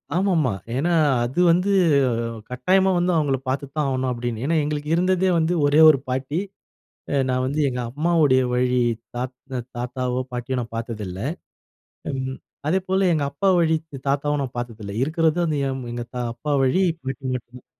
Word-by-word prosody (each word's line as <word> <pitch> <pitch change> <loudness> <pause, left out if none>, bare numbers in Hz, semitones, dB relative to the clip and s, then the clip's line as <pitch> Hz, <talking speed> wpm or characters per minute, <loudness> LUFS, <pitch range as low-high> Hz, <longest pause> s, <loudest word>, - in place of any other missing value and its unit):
ஆமாமா, 175 - +2 0.2
ஏன்னா 170 +6 +1 0.3
அது 125 +7 -2
வந்து 180 +4 +2 0.8
கட்டாயமா 185 +10 +2
வந்து 175 +1 +2
அவங்கள 140 -3 +1
பார்த்து 140 +2 -1
தான் 150 -2 +1
ஆகணும் 130 -1 -1
அப்டின்னு. 120 -1 -3
ஏன்னா 165 +3 +1
எங்களுக்கு 150 0 -3
இருந்ததே 185 +1 +2
வந்து 160 +2 +1
ஒரே 145 +2 +4
ஒரு 140 -4 +4
பாட்டி. 130 +5 -1 0.7
அ - - -1
நான் 130 0 +1
வந்து 145 +4 -1
எங்க 125 -1 -3
அம்மாவுடைய 150 -2 +3
வழி 125 0 +2 0.3
தாத் 125 +1 -4 0.4
தாத்தாவோ 125 +1 -2
பாட்டியோ 125 +1 -3
நான் 115 -1 -7
பார்த்ததில்ல. 105 -5 -5 0.9
ம் 130 0 -3 0.3
அதேபோல 190 +2 +1
எங்க 150 -3 0
அப்பா 170 +8 0
வழி 160 -1 +3 0.3
தாத்தாவும் 145 +1 +1
நான் 125 -2 -6
பார்த்ததில்ல. 110 -4 -6
இருக்கறது 160 +2 +1
வந்து 155 -3 0 0.3
எங்க 120 0 -4 0.3
அப்பா 145 +5 -3
வழி 135 +9 +2 0.2
பாட்டி 135 +1 -6
மட்டும்தான். 125 0 -8
135 Hz, 150 wpm, -23 LUFS, 125-160 Hz, 0.9 s, ஒரே